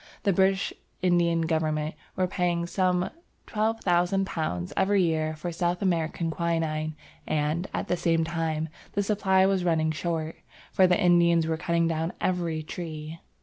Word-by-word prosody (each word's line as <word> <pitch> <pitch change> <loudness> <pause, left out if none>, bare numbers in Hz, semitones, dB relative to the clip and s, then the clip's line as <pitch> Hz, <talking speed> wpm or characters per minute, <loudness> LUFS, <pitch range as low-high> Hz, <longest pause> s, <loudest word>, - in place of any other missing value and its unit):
The 200 - +3
British 190 +1 +2 0.3
Indian 170 -2 +3
government 155 -1 0 0.2
were 185 - +1
paying 175 -2 0
some 180 0 0 0.3
£12,000 180 - 0
every 195 0 +3
year 155 -2 0
for 170 +3 -5
South 175 +1 -1
American 165 -2 0
quinine 160 -2 -1 0.3
and, 155 +4 0
at - - -3
the - - +1
same 165 -1 +1
time, 160 -1 -2 0.2
the 205 - +1
supply 195 -2 +3
was 190 -1 +2
running 160 -2 +2
short, 160 0 -3 0.3
for 185 - +5
the 180 +2 +3
Indians 170 -3 +4
were 160 0 0
cutting 170 0 +1
down 165 +1 -1
every 170 -4 -1
tree. 155 -1 -6
170 Hz, 145 wpm, -27 LUFS, 160-180 Hz, 0.3 s, for